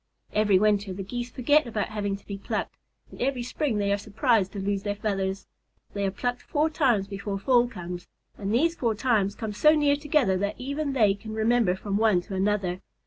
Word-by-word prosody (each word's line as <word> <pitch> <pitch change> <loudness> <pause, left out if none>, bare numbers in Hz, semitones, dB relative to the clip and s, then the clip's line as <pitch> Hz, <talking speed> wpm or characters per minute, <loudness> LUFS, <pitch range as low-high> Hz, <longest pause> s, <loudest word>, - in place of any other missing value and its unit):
Every 210 -2 +4
winter 205 -1 +2
the 195 +1 -5
Geese 240 +5 -5
forget 285 +3 +2
about 215 -3 -2
having 205 -2 -2
to 195 - -14
be 200 - -5
plucked, - - -3 0.4
and - - -11
every 255 -1 0
spring 250 -1 -1
they 200 -1 +1
are 200 - 0
surprised 215 -2 +1
to 200 - -5
lose 195 0 -1
their 205 0 -2
feathers. 195 -2 -2 0.5
They 200 -1 -1
are - - +1
plucked 245 +5 -3
four 310 +1 0
times 245 - +2
before 200 0 -4
fall 245 +4 +3
comes, 180 -5 -7 0.3
and 200 -1 -4
these 315 +9 +3
four 230 -8 0
times 210 -4 +1
come 220 -1 -4
so 305 +9 +5
near 290 -2 +3
together 290 - +1
that 200 +1 -1
even 280 +2 -2
they 215 -7 +4
can 215 +2 -8
remember 220 -3 +2
from 200 +1 -2
one 215 -4 +4
to 195 - -9
another. 190 -2 0
210 Hz, 205 wpm, -26 LUFS, 195-245 Hz, 0.5 s, so